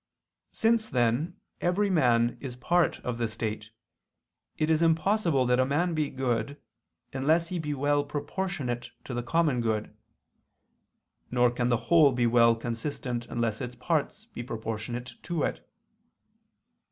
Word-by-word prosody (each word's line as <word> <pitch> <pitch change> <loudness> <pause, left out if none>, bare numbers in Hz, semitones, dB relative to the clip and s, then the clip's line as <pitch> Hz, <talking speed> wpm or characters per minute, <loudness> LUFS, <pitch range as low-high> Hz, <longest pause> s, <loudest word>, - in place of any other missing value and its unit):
Since 225 -1 +1
then 125 - 0 0.2
every 195 +3 +1
man 120 -8 +3
is 130 -3 -6
a - - -19
part 175 +6 +2
of 120 -1 -4
the 115 - +1
state, 110 -1 -4 0.9
it 155 - +1
is 160 0 +3
impossible 165 -3 +2
that 125 0 +2
a - - +5
man 165 +5 +1
be 155 -2 0
good, 130 +2 -2 0.5
unless 160 +5 +2
he 180 - -2
be 150 -2 -2
well 145 +1 +2
proportionate 145 -4 -3
to 130 - -6
the 120 - -1
common 150 -1 +1
good: 110 -2 -2 1.3
nor 125 -1 +3
can 120 0 -1
the 120 - +3
whole 160 -4 +7
be 120 -1 +1
well 115 0 +5
consistent 120 +1 -4
unless 115 -2 -2
its 125 -1 -5
parts 160 - -1
be - - -5
proportionate 115 +1 -5
to 170 -3 -2
it. - - -3
130 Hz, 145 wpm, -28 LUFS, 120-160 Hz, 1.3 s, whole